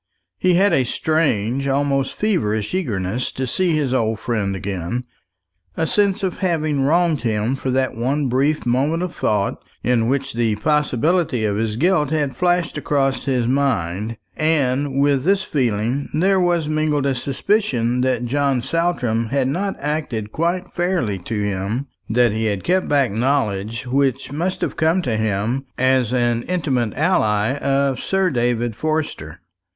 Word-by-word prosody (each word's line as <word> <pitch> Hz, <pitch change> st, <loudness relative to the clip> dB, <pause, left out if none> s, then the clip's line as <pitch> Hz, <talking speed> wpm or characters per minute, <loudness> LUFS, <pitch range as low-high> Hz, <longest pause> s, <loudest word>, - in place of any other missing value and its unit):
He 180 Hz, -1 st, +3 dB
had 195 Hz, +1 st, +4 dB
a 135 Hz, -, +3 dB
strange, 135 Hz, -3 st, 0 dB
almost 135 Hz, 0 st, 0 dB
feverish 110 Hz, -, 0 dB
eagerness 115 Hz, -, -2 dB
to 130 Hz, -, -2 dB
see 170 Hz, +6 st, +1 dB
his 140 Hz, -4 st, 0 dB
old 110 Hz, -3 st, +1 dB
friend 110 Hz, -4 st, -2 dB
again; 95 Hz, +5 st, -4 dB, 0.7 s
a 160 Hz, -, +1 dB
sense 200 Hz, +3 st, +1 dB
of 185 Hz, -2 st, -1 dB
having 155 Hz, -6 st, 0 dB
wronged 165 Hz, +2 st, +2 dB
him 110 Hz, +2 st, 0 dB
for 135 Hz, 0 st, -4 dB
that 130 Hz, 0 st, +1 dB
one 135 Hz, +5 st, 0 dB
brief 140 Hz, +5 st, +1 dB
moment 140 Hz, +8 st, +1 dB
of 180 Hz, -, -4 dB
thought 100 Hz, -2 st, -1 dB, 0.2 s
in 120 Hz, -1 st, +2 dB
which 135 Hz, +1 st, -1 dB
the 115 Hz, -2 st, +1 dB
possibility 150 Hz, -, +1 dB
of 100 Hz, -1 st, 0 dB
his 110 Hz, -1 st, -1 dB
guilt 155 Hz, +1 st, +2 dB
had 145 Hz, -3 st, -1 dB
flashed 175 Hz, -3 st, +1 dB
across 135 Hz, -2 st, 0 dB
his 125 Hz, -4 st, +1 dB
mind; 115 Hz, -6 st, 0 dB, 0.2 s
and 140 Hz, -3 st, +1 dB
with 140 Hz, -2 st, +2 dB
this 195 Hz, +3 st, +2 dB
feeling 125 Hz, -, -1 dB
there 190 Hz, +4 st, +3 dB
was 175 Hz, -3 st, +1 dB
mingled 155 Hz, -2 st, 0 dB
a 135 Hz, -, +2 dB
suspicion 125 Hz, -, 0 dB
that 125 Hz, -2 st, 0 dB
John 135 Hz, -1 st, 0 dB
Saltram 125 Hz, -10 st, 0 dB
had 135 Hz, +2 st, 0 dB
not 190 Hz, +8 st, -1 dB
acted 140 Hz, -8 st, -3 dB
quite 175 Hz, +5 st, -1 dB
fairly 175 Hz, -, -1 dB
to 105 Hz, +3 st, -3 dB
him; 100 Hz, +6 st, -2 dB, 0.2 s
that 120 Hz, +1 st, +3 dB
he 110 Hz, +1 st, -1 dB
had 100 Hz, -3 st, -1 dB
kept 185 Hz, +1 st, +1 dB
back 140 Hz, -5 st, +2 dB
knowledge 115 Hz, -1 st, -1 dB
which 135 Hz, +1 st, 0 dB
must 175 Hz, +6 st, -2 dB
have -, -, -2 dB
come 165 Hz, +3 st, +2 dB
to 120 Hz, -7 st, -1 dB
him 110 Hz, +5 st, -1 dB
as 130 Hz, -2 st, +2 dB
an 120 Hz, -2 st, +1 dB
intimate 135 Hz, -, -1 dB
ally 115 Hz, -, +2 dB
of 140 Hz, -1 st, +1 dB
Sir 190 Hz, -2 st, +1 dB
David 120 Hz, -2 st, 0 dB
Forster. 145 Hz, -, -3 dB
135 Hz, 155 wpm, -20 LUFS, 115-155 Hz, 0.7 s, had